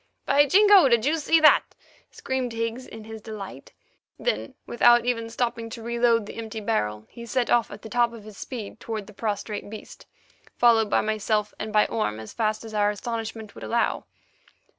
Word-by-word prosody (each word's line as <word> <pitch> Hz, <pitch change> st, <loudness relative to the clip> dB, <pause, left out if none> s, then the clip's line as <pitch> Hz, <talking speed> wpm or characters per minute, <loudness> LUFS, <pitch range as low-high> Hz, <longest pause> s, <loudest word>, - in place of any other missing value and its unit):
"By 285 Hz, +1 st, +4 dB
Jingo! 400 Hz, -3 st, +6 dB
Did 235 Hz, -1 st, +3 dB
you 310 Hz, +3 st, +2 dB
see 325 Hz, +2 st, +3 dB
that?" 305 Hz, -, +7 dB, 0.5 s
screamed 260 Hz, -2 st, -3 dB
Higgs 230 Hz, +3 st, -3 dB
in 225 Hz, -1 st, -10 dB
his 220 Hz, 0 st, -9 dB
delight. 210 Hz, -3 st, -9 dB, 0.5 s
Then, -, -, -2 dB
without 240 Hz, 0 st, +4 dB
even 230 Hz, -2 st, -1 dB
stopping 235 Hz, -1 st, -2 dB
to 225 Hz, 0 st, -8 dB
reload 235 Hz, -1 st, +2 dB
the -, -, -10 dB
empty 225 Hz, -1 st, -5 dB
barrel, 105 Hz, -, -2 dB
he 235 Hz, -, -11 dB
set 250 Hz, 0 st, 0 dB
off 240 Hz, -1 st, +3 dB
at 205 Hz, -, -11 dB
the -, -, -7 dB
top 240 Hz, 0 st, +2 dB
of 230 Hz, -3 st, -11 dB
his 215 Hz, -1 st, -12 dB
speed 230 Hz, -1 st, -7 dB
toward 220 Hz, -3 st, -5 dB
the 210 Hz, -, -14 dB
prostrate 205 Hz, 0 st, -4 dB
beast, 215 Hz, 0 st, -11 dB, 0.5 s
followed 225 Hz, -3 st, +4 dB
by -, -, +3 dB
myself 215 Hz, -1 st, -1 dB
and 215 Hz, 0 st, -4 dB
by 210 Hz, 0 st, +4 dB
Orme, 110 Hz, -, -2 dB
as 110 Hz, -, -9 dB
fast 215 Hz, 0 st, -1 dB
as 220 Hz, -, -9 dB
our 205 Hz, -1 st, +2 dB
astonishment 225 Hz, 0 st, -5 dB
would -, -, -11 dB
allow. 235 Hz, 0 st, 0 dB
225 Hz, 185 wpm, -25 LUFS, 215-240 Hz, 0.5 s, that